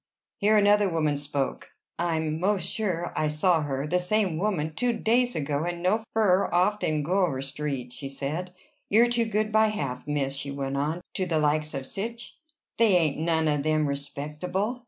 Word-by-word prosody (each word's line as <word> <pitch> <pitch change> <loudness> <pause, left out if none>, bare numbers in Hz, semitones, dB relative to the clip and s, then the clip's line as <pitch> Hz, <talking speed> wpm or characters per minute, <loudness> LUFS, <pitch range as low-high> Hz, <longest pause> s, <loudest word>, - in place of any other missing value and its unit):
Here 215 +1 +4
another 205 -1 +4
woman 155 -3 +1
spoke. 145 -1 -3 0.3
"I'm 160 -2 -1
'most 195 +2 +1
sure 180 -6 -2
I 155 - +1
saw 160 +2 +2
her 140 -1 -2
the 180 +4 +1
same 180 -2 +1
woman 170 -6 -1
two 245 +8 0
days 245 +2 +1
ago, 145 0 -1
and 175 0 -4
no 215 +5 +2
furrer 200 -3 +3
off 185 +4 +2
than 155 -5 0
Gower 175 -4 +1
Street," 135 -3 -4
she 135 +2 -6
said. 150 +7 -4 0.4
"You're 230 +4 +5
too 240 -1 +1
good 215 0 -1
by 220 0 +4
half, 140 -13 -4
miss," 140 -2 -1
she 140 0 -4
went 140 -1 -3
on, 150 +5 -1
"to 185 - -1
the 165 -2 +1
likes 150 0 +1
of 135 -1 -4
sich. 230 - -5 0.4
They 220 -5 +5
ain't 155 -4 +1
none 160 -1 +1
of 150 -1 +1
them 155 +1 +1
respectable." 150 - -3
165 Hz, 180 wpm, -27 LUFS, 145-205 Hz, 0.4 s, You're